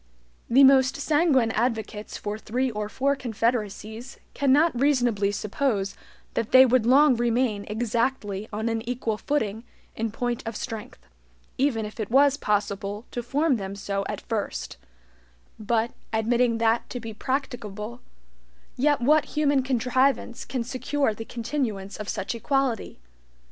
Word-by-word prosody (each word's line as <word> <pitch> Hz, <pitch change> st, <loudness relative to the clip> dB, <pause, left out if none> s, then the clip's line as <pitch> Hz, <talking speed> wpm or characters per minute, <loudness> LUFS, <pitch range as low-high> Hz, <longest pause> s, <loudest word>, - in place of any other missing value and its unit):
The 265 Hz, +4 st, +6 dB
most 265 Hz, -1 st, +6 dB
sanguine 285 Hz, -5 st, +2 dB
advocates 220 Hz, -2 st, -2 dB
for 210 Hz, +1 st, -4 dB
three 250 Hz, +4 st, -1 dB
or 210 Hz, -1 st, -4 dB
four 280 Hz, +5 st, +1 dB
confederacies 230 Hz, -1 st, -3 dB, 0.2 s
cannot 280 Hz, -1 st, +3 dB
reasonably 245 Hz, -8 st, +2 dB
suppose 205 Hz, -1 st, -1 dB, 0.4 s
that 225 Hz, -, -1 dB
they 260 Hz, 0 st, +8 dB
would 250 Hz, -2 st, +2 dB
long 275 Hz, +1 st, +6 dB
remain 235 Hz, -3 st, 0 dB
exactly 220 Hz, -2 st, -1 dB
on 220 Hz, +2 st, -2 dB
an 225 Hz, -1 st, -1 dB
equal 230 Hz, -4 st, -2 dB
footing 225 Hz, -7 st, -1 dB, 0.3 s
in 225 Hz, 0 st, -1 dB
point 240 Hz, +2 st, -2 dB
of 225 Hz, -, -4 dB
strength, 225 Hz, +2 st, -6 dB, 0.6 s
even 250 Hz, -5 st, +1 dB
if 210 Hz, +2 st, -9 dB
it 215 Hz, -, -3 dB
was 275 Hz, +3 st, +5 dB
possible 205 Hz, -2 st, -2 dB
to 240 Hz, -, -3 dB
form 275 Hz, +3 st, +1 dB
them 195 Hz, -1 st, -5 dB
so 200 Hz, 0 st, -2 dB
at -, -, -4 dB
first; -, -, -4 dB, 0.8 s
but, 225 Hz, +2 st, 0 dB, 0.2 s
admitting 230 Hz, +1 st, +2 dB
that 230 Hz, +1 st, +1 dB
to 245 Hz, -, -5 dB
be 225 Hz, -1 st, -7 dB
practicable, 235 Hz, -3 st, -4 dB, 0.7 s
yet 290 Hz, 0 st, +2 dB
what 300 Hz, +5 st, +4 dB
human 285 Hz, -2 st, +3 dB
contrivance 255 Hz, 0 st, 0 dB
can 250 Hz, -1 st, -3 dB
secure 255 Hz, +1 st, -1 dB
the 225 Hz, +2 st, -7 dB
continuance 230 Hz, -5 st, -3 dB
of 210 Hz, -1 st, -6 dB
such -, -, -2 dB
equality? 265 Hz, 0 st, -1 dB
235 Hz, 140 wpm, -25 LUFS, 215-265 Hz, 0.8 s, they